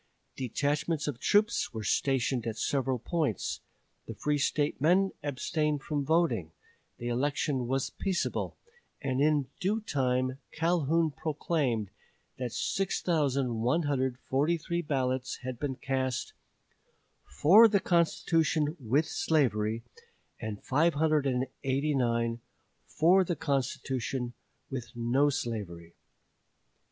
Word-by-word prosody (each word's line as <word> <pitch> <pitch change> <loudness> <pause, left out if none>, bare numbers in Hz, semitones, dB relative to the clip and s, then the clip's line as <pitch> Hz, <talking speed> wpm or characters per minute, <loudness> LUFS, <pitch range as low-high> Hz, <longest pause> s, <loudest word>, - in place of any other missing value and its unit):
Detachments 145 +5 -1
of 135 -5 -3
troops 210 - +2
were 110 - -3
stationed 125 +2 +1
at 110 -1 -3
several 135 +1 0
points; 145 - -2 0.5
the - - -6
free 150 0 0
State 145 0 0
men 185 +5 +4
abstained 150 +1 -1
from 145 -2 -1
voting; 135 - +1 0.5
the 120 - -5
election 130 +1 0
was 135 +1 -1
peaceable; 190 -3 -2 0.4
and 135 -2 -1
in 150 -2 +3
due 200 +4 +1
time 130 - 0
Calhoun 165 -1 +1
proclaimed 140 - -1 0.5
that 125 -2 -3
6143 145 0 0
ballots 130 -4 -1
had 125 -2 -5
been 140 -3 -2
cast 130 -1 -2 0.9
"for 165 - +6
the 205 -2 +2
constitution 165 -3 +1
with 135 +5 +1
slavery," 115 -7 +1 0.6
and 110 -3 -5
589 135 -5 +1 0.5
"for 180 +5 +4
the 175 -1 -2
constitution 130 -3 -2 0.4
with 120 -3 -6
no 120 +5 +2
slavery." 100 - -4
140 Hz, 100 wpm, -30 LUFS, 125-155 Hz, 0.9 s, for